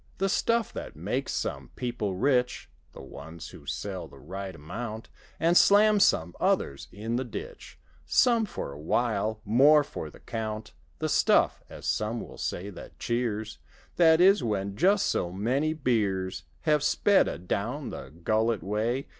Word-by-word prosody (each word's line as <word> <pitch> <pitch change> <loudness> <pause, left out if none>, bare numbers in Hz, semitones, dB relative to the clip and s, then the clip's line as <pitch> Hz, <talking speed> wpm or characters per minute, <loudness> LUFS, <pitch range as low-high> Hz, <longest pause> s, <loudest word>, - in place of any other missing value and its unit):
The 195 +1 +1
stuff 230 +3 +1
that - - -7
makes - - -2
some - - -3
people 120 -6 -3
rick 125 +3 +1 0.2
(The - - -10
ones 80 +5 -9
who 70 - -14
sell 95 +6 -4
the - - -16
right 95 0 -7
amount) 110 +9 -6 0.3
And 170 +2 +3
slams 205 +1 +6
some 85 +2 +1
others 70 0 0
in 110 +4 -3
the 130 - -1
ditch— 465 - -8 0.3
Some 235 -3 +4
for 70 - -5
a 70 - -10
while—more 115 - +3
for - - -7
the - - -16
count. 110 -2 -5 0.2
The - - -1
stuff - - +3
(as - - -10
some 110 +2 -1
will - - -9
say) 100 +3 -3
that - - -11
cheers: 110 -3 -2 0.4
That 160 -2 +6
is, 190 -4 +6
when 100 -3 -2
just 195 - +3
so 85 - 0
many 125 +11 0
beers 105 -10 -1 0.2
Have 150 -2 +2
sped 200 +7 +3
adown 115 - -3
the 65 - -8
gullet 110 +8 0
way. 110 +7 -1
115 Hz, 155 wpm, -28 LUFS, 100-150 Hz, 0.4 s, slams